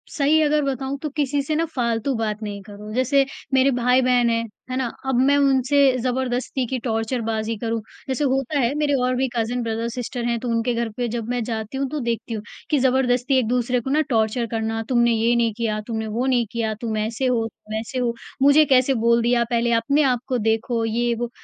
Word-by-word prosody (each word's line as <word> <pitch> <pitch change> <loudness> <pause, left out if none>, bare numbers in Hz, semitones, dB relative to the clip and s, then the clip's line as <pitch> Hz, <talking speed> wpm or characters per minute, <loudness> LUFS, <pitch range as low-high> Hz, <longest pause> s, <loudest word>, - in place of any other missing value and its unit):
सही 310 +1 +3
अगर 300 0 +2
बताऊँ 270 0 -2
तो 305 - -3
किसी 285 0 -1
से 305 +2 -2
ना 325 +2 +1
फालतू 235 +1 0
बात 215 -1 -2
नहीं 205 -1 -5
करो, 210 +1 -10
जैसे 265 +3 +3 0.3
मेरे 265 +1 +4
भाई-बहन 250 0 +3
हैं, 230 0 +1 0.3
है 255 - -3
ना? 260 -2 0 0.2
अब 265 - +1
मैं 285 0 +4
उनसे 275 0 +3 0.2
ज़बरदस्ती 255 +1 -1
की 260 - -2
टॉर्चर 230 +1 -2
बाज़ी 220 0 -1
करूँ। 230 +1 -2 0.3
जैसे 265 +2 -1
होता 270 +2 -1
है 245 0 +1
मेरे 295 -1 +1
और 255 0 +1
भी 265 +1 +1
कज़न 240 +2 -1
ब्रदर-सिस्टर 235 +2 -3
हैं 235 0 0
तो 245 - -5
उनके 230 +1 0
घर 235 0 -1
पे 245 -1 -1
जब 230 -1 -4
मैं 245 0 -1
जाती 220 +2 -4
हूँ 275 0 -1
तो 305 - -2
देखती 235 -2 -3
हूँ, 215 -2 -4 0.3
कि 295 - +2
ज़बरदस्ती 260 0 +2
एक-दूसरे 245 +1 0
को 265 - -5
ना 300 +3 +3
टॉर्चर 225 0 +1
करना 225 0 -2
तुमने 240 -2 +3
ये 230 +2 +2
नहीं 230 -2 +1
किया, 220 -2 -1
तुमने 220 -2 -3
वो 230 +4 -2
नहीं 250 -3 +2
किया। 225 -2 -1
तुम 225 -2 -2
ऐसे 220 +4 -2
हो, 235 -3 +1
तुम 215 -1 -10
ऐसे 230 +3 -4
हो, 240 -2 0 0.3
मुझे 285 +3 +6
कैसे 265 -1 +4
बोल 235 0 +4
दिया 240 0 +3
पहले 235 0 +1
अपने 280 +6 +2
आपको 250 +1 -2
देखो, 225 +1 0
ये-वो। 235 +1 -1
240 Hz, 210 wpm, -22 LUFS, 230-265 Hz, 0.3 s, मुझे